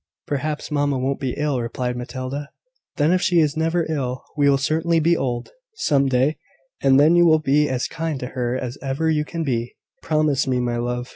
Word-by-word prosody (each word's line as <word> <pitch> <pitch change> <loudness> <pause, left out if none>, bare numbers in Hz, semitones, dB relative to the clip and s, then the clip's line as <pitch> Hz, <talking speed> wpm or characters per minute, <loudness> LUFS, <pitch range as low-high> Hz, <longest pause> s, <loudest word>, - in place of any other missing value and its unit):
"Perhaps 150 +2 -3
mamma 145 -2 +1
won't 135 +2 -1
be 130 -3 -2
ill," 145 -4 0
replied 125 +1 -3
Matilda. 130 +4 -5 0.5
"Then 150 +2 +3
if 185 0 +2
she 175 -2 +3
is 150 -2 +2
never 165 +1 0
ill, 130 -5 -3
she 145 -1 +3
will 140 - +4
certainly 160 +4 +1
be 170 +2 +3
old, 120 -5 -3 0.2
some 140 - +2
day; 135 +4 +1 0.4
and 135 0 +5
then 155 +4 +5
you 175 - +6
will 160 -1 +6
be 150 0 +2
as 130 -1 -1
kind 160 -4 -3
to 125 - -3
her 125 -1 -2
as 125 +1 -5
ever 140 +4 0
you 150 -1 +1
can 165 +2 -4
be, 120 -4 -2 0.3
promise 155 -3 +1
me, 130 -1 +1
my 120 -1 -1
love. 125 +1 -3
140 Hz, 205 wpm, -22 LUFS, 125-155 Hz, 0.5 s, you